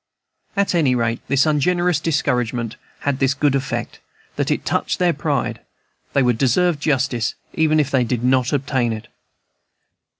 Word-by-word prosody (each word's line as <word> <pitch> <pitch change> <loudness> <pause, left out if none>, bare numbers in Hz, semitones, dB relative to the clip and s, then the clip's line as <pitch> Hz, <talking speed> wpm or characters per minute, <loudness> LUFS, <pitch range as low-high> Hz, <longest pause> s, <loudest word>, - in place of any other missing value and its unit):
At 200 -1 +1
any 145 -7 +3
rate, 115 -1 -1
this 140 +2 +3
ungenerous 175 +2 +2
discouragement 125 -7 -1 0.3
had 140 -2 -1
this 135 0 +2
good 145 -1 +2
effect, 135 0 -3 0.4
that - - -1
it - - -1
touched - - 0
their 175 -2 +2
pride; 145 -2 -2 0.5
they 140 - +3
would 125 -2 +1
deserve 150 +5 +2
justice, 130 -6 0 0.2
even 155 -1 +2
if 145 -2 0
they 130 -2 +3
did 120 0 -2
not 130 -1 +2
obtain 130 -4 0
it. 110 +1 -8
135 Hz, 155 wpm, -20 LUFS, 125-155 Hz, 0.5 s, any